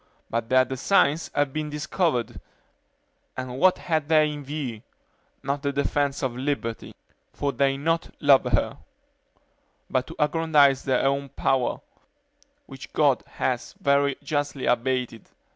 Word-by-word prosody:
but 115 0 -2
their 130 0 +5
designs 140 +4 +1
have 145 -2 +1
been 155 -1 -3
discovered; 150 - -1 1.0
and 130 0 -5
what 185 0 +5
had 155 -4 -1
they 155 -1 +4
in 145 -1 -7
view? 135 -6 -5 0.6
not 140 +1 -2
the 140 - -1
defense 140 0 -1
of 125 -2 -1
liberty; 125 -4 -3 0.4
for 145 - -1
they 135 -1 +2
do 140 - -10
not 165 +1 0
love 140 -3 +5
her; 120 -5 0 1.1
but 130 -1 0
to - - -9
aggrandize 150 -3 +3
their 130 -2 +1
own 140 0 0
power, 135 -1 0 0.9
which - - -11
God - - +3
has - - -2
very 140 0 +2
justly 145 -2 -2
abated. 125 -2 -1
140 Hz, 135 wpm, -25 LUFS, 130-150 Hz, 1.1 s, their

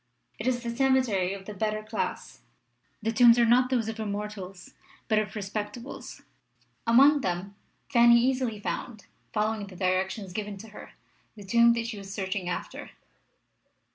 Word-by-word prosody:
It 220 - -3
is 245 -1 0
the 235 0 -4
cemetery 255 -8 +2
of 195 -1 -11
the 210 - -7
better 215 +1 -2
class. 215 +1 -4 0.6
The 225 - +1
tombs 235 0 +6
are 240 - +5
not 250 +2 +4
those 240 -4 0
of 225 0 -5
Immortals 200 -3 -6 0.3
but 215 -1 +3
of 210 -2 -3
Respectables. 210 +4 -6 0.6
Among 275 +5 +6
them 185 +1 -3 0.3
Fanny 235 -1 +6
easily 250 -3 0
found, 215 +1 -5 0.3
following 215 -1 -1
the 190 - -12
directions 185 +1 -1
given 210 0 -4
to 220 +3 -11
her, 210 - -12 0.4
the 205 - -11
tomb 235 +3 +5
she 230 -3 -5
was 195 -1 -9
searching 190 -2 -3
after. 180 - -5
215 Hz, 150 wpm, -27 LUFS, 200-235 Hz, 0.6 s, tombs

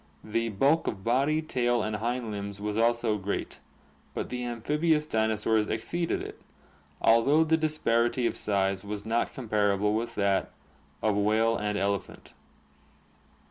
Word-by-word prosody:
The 115 +2 -1
bulk 135 +10 +2
of 95 -2 -3
body, 140 +7 +2
tail, 120 -5 0
and 105 0 -2
hind 120 +1 -2
limbs 100 -1 -5
was 105 0 -3
also 115 -1 +2
great, 100 +1 -4 0.6
but - - -3
the 125 0 -4
amphibious 150 +7 0
dinosaurs 110 -3 +1
exceeded 170 +9 -2
it, - - -9 0.6
although 135 +8 +4
the 160 0 +3
disparity 125 -6 +1
of - - 0
size 95 -2 0
was 105 0 -5
not 115 +1 0
comparable 105 -4 +1
with 115 +2 -2
that 100 -1 +1 0.5
of 110 -2 +2
whale 110 +3 +2
and 105 -1 -2
ele 100 0 +1
phant. - - -16
115 Hz, 140 wpm, -28 LUFS, 105-125 Hz, 0.6 s, although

